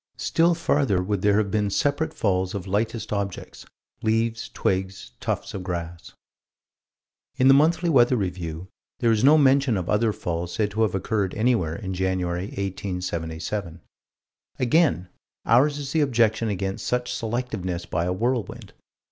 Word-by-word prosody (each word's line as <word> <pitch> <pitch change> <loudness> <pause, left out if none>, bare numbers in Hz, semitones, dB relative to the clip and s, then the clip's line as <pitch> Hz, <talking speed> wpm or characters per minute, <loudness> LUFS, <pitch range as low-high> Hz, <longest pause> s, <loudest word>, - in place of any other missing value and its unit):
Still 170 +1 +2
farther 140 - +1
would 100 0 -2
there 105 0 +3
have 105 -2 0
been 105 -1 +1
separate 145 +9 0
falls 95 -2 -1
of 95 -2 -4
lightest 110 +3 -2
objects: 100 -2 -5 0.3
leaves, 115 +1 0
twigs, 95 0 -2
tufts - - -3
of 95 - -4
grass. 85 -2 -6 1.2
In 130 - +4
the 135 - +8
Monthly 160 +5 +3
Weather 130 -5 +4
Review 90 -4 -4 0.3
there 120 -3 +2
is 110 0 +1
no 150 +4 +7
mention 135 -5 +4
of 90 -2 -3
other 110 +1 +2
falls 85 -2 -4
said 105 -2 0
to 110 +3 -2
have 105 -4 +2
occurred 100 0 -1
anywhere 110 -8 +1
in 95 +2 -5
January, 90 -1 -1
1877. 90 -2 -4 0.8
Again 125 - +2 0.4
ours 140 +6 +4
is 140 -2 -5
the 160 - +2
objection 115 -5 +2
against 95 0 -3
such 125 0 -1
selectiveness 110 -7 -3
by 85 0 -1
a 90 - -1
whirlwind. 115 +1 -2
105 Hz, 150 wpm, -24 LUFS, 90-120 Hz, 1.2 s, the